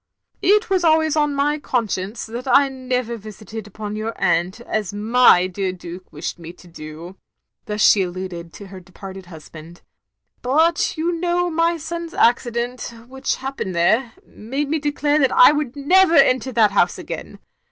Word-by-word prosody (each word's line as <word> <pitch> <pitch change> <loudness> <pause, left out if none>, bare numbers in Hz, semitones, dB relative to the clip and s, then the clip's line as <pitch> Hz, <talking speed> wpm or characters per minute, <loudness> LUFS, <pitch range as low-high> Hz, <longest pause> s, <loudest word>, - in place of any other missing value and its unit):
It 420 +3 +3
was 380 -3 +1
always 315 -1 +3
on 295 -2 +1
my 295 +2 0
conscience 215 -5 -3
that 235 +4 -7
I 275 +1 +4
never 250 -3 -3
called 215 +1 -9
upon 210 0 -7
yoxir 215 +2 -4
atint, 180 +2 0
as 215 -5 -3
my 210 -2 +4
dear 185 0 -3
Duke 180 0 -10
wished 155 +3 -6
me 165 0 -9
to 180 - -18
do 165 +3 -10
— - - -58
*' - - -55
thus 210 0 -3
she 205 - +6
alluded 175 -2 -5
to 200 - -10
her 190 -1 -10
departed 190 +1 -11
husband, 160 0 -13 0.3
— - - -60 0.2
"but 320 +8 +1
you 330 +2 0
know 350 +1 -1
my 335 +1 +1
son's 335 +1 -6
accident, 240 +1 0 0.2
which 265 +1 -3
happened 265 -9 -5
there, 225 +8 +2
made 270 +6 -5
me 315 +1 0
declare 295 0 0
I 335 -3 +7
would 295 -4 -2
never 335 +5 +4
enter 260 -2 +4
that 220 -4 +3
house 200 - +2
again. - - -8
235 Hz, 170 wpm, -20 LUFS, 190-295 Hz, 0.3 s, I